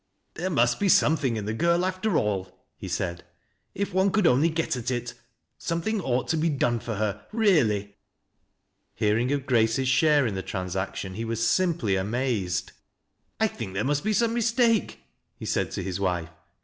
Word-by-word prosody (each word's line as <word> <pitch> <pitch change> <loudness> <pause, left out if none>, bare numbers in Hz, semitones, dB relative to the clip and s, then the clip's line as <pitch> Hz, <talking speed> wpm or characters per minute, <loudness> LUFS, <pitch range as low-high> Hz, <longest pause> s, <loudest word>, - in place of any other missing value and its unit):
"There 180 +3 -3
must 120 -7 +2
be 200 - +2
something 145 -8 +3
in 105 - -4
the 105 - -2
girl, 170 +7 +2
after 185 0 0
all," 95 -3 -2
be - - -6
said, 85 -2 -3 0.3
" - - -46
if 200 -1 -2
one 190 +1 +3
could 210 0 +1
only 145 +4 +4
get 160 -3 -1
at 120 -1 -3
it. 120 -1 -3 0.5
Something 180 +6 -1
ought 130 -5 -1
to 165 - +1
bo 165 +2 +1
done 120 -5 +1
for 115 0 -5
her, 105 -1 -3
really." 120 - +2 1.0
Hearing 110 +4 +1
of 140 -2 -1
Grace's 120 +1 +2
share 145 +1 +4
in 110 - -1
the 95 - -3
transaction, 95 +1 -4
he 110 +4 -4
wm 115 0 -2 0.2
limply 160 - 0
amazed. 100 -4 -1 0.3
" - - -48
1 - - +4
think 95 - -7
there 100 - 0
must 145 +2 0
be 215 - 0
some 230 +2 +2
mistake," 230 -1 +1 0.3
he - - -8
said - - 0
to - - -3
his 95 0 -3
wife. 90 -4 -1
125 Hz, 185 wpm, -26 LUFS, 105-170 Hz, 1.0 s, only